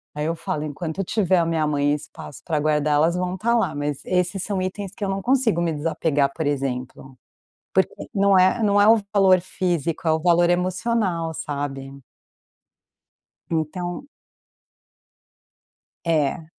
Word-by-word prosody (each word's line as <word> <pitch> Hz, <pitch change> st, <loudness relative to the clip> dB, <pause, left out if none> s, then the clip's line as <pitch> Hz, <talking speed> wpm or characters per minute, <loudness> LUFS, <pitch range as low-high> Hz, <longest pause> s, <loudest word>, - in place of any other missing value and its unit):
Aí 150 Hz, -, -2 dB
eu 165 Hz, +1 st, -1 dB
falo, 150 Hz, -1 st, -3 dB
enquanto 160 Hz, +5 st, -4 dB
tiver 185 Hz, -1 st, +1 dB
na 165 Hz, -, +2 dB
minha 160 Hz, -2 st, 0 dB
mãe 145 Hz, 0 st, +1 dB
espaço 150 Hz, -1 st, -8 dB
para 155 Hz, -3 st, -1 dB
guardar 150 Hz, 0 st, +1 dB
elas 165 Hz, +4 st, +3 dB
vão 180 Hz, 0 st, -2 dB
estar 235 Hz, +4 st, +1 dB
lá, 230 Hz, -, +1 dB
mas 145 Hz, -1 st, -3 dB
esses 180 Hz, +1 st, 0 dB
são 200 Hz, -3 st, -2 dB
itens 190 Hz, +1 st, -4 dB
que 205 Hz, -, -4 dB
eu 195 Hz, -, -2 dB
não 195 Hz, 0 st, -2 dB
consigo 245 Hz, -8 st, +2 dB
me 170 Hz, -1 st, 0 dB
desapegar 150 Hz, -2 st, 0 dB
por 160 Hz, -, -2 dB
exemplo. 130 Hz, -1 st, -4 dB, 0.6 s
Porque -, -, +2 dB, 0.2 s
não 200 Hz, -1 st, +4 dB
é 185 Hz, +5 st, +3 dB
não 205 Hz, -1 st, +3 dB
é 205 Hz, -, +6 dB
o 225 Hz, 0 st, +6 dB
valor 190 Hz, -2 st, +5 dB
físico, 170 Hz, -3 st, -2 dB
é 160 Hz, -, +4 dB
o 160 Hz, -, +1 dB
valor 175 Hz, 0 st, +4 dB
emocional, 180 Hz, -1 st, 0 dB
sabe. 140 Hz, -2 st, -5 dB, 1.5 s
Então 175 Hz, -, -3 dB, 2.0 s
É. 155 Hz, 0 st, 0 dB
170 Hz, 150 wpm, -23 LUFS, 150-190 Hz, 2.0 s, é